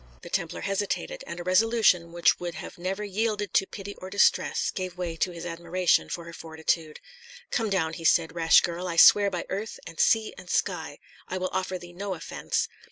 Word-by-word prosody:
The - - -10
Templar - - -2
hesitated, 205 - -2
and 175 - -6
a - - -5
resolution 185 -2 +3
which 170 0 +3
would 175 -1 -5
have - - -9
never 190 +4 -3
yielded 210 0 -2
to 195 - +3
pity 200 0 -7
or 185 - -8
distress 200 +1 +2
gave 185 -2 -5
way 175 -2 -3
to 185 - +1
his 170 -1 -8
admiration 175 +1 +1
for 170 - -4
her 170 0 -10
fortitude. 160 -1 -2 0.5
"Come 225 -3 0
down," 165 -5 0
he 165 - -7
said, 165 0 +3
"rash 165 -1 +5
girl! 175 +1 -3
I 170 - -3
swear 200 +4 +7
by 180 -3 -4
earth, 205 +3 -4
and 165 0 -10
sea, 220 -1 +3
and 180 - -12
sky, 160 -7 -1 0.3
I 185 - -3
will 185 0 -2
offer 185 0 -1
thee 175 -1 -12
no 195 +1 -4
offence. 165 - -2
180 Hz, 200 wpm, -27 LUFS, 170-200 Hz, 0.5 s, swear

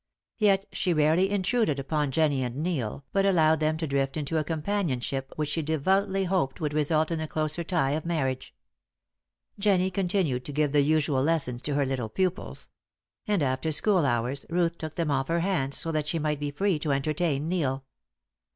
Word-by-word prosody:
Yet 200 -2 +3
she 180 - 0
rarely 160 +5 +3
intruded 205 - +1
upon 145 +1 -1
Jennie 145 -2 +1
and 120 -1 -4
Neil, 140 -5 -2
but 195 - +3
allowed 160 -5 +4
them 155 0 +1
to 160 - -2
drift 135 0 -1
into 155 +2 -1
a - - 0
companionship 150 - -2
which 150 -1 -2
she 160 +2 0
devoutly 190 +6 +1
hoped 180 -7 0
would 150 -2 -2
result 155 +2 +2
in 165 - -1
the 155 - -3
closer 155 +2 -2
tie 160 -6 +1
of 155 +2 -1
marriage. 135 -6 -2 1.1
Jennie 190 -2 +2
continued 180 -9 0
to - - -4
give 150 0 +1
the 145 0 +4
usual 145 -2 +2
lessons 140 -5 0
to 145 +2 -2
her 140 -1 +2
little 130 -4 -2
pupils; 185 - -2 0.6
and 205 -7 +2
after 130 +4 0
school 185 +3 +3
hours 125 +1 0
Ruth 170 0 +1
took 155 -1 -6
them 165 -3 -1
off 135 -1 0
her 170 0 +1
hands, 165 -7 0
so 165 - -2
that 155 -2 -1
she 165 - 0
might 150 -2 -1
be 145 0 -2
free 185 +3 0
to 150 -1 -1
entertain 150 +1 0
Neil. 140 -7 -1
155 Hz, 190 wpm, -27 LUFS, 140-175 Hz, 1.1 s, allowed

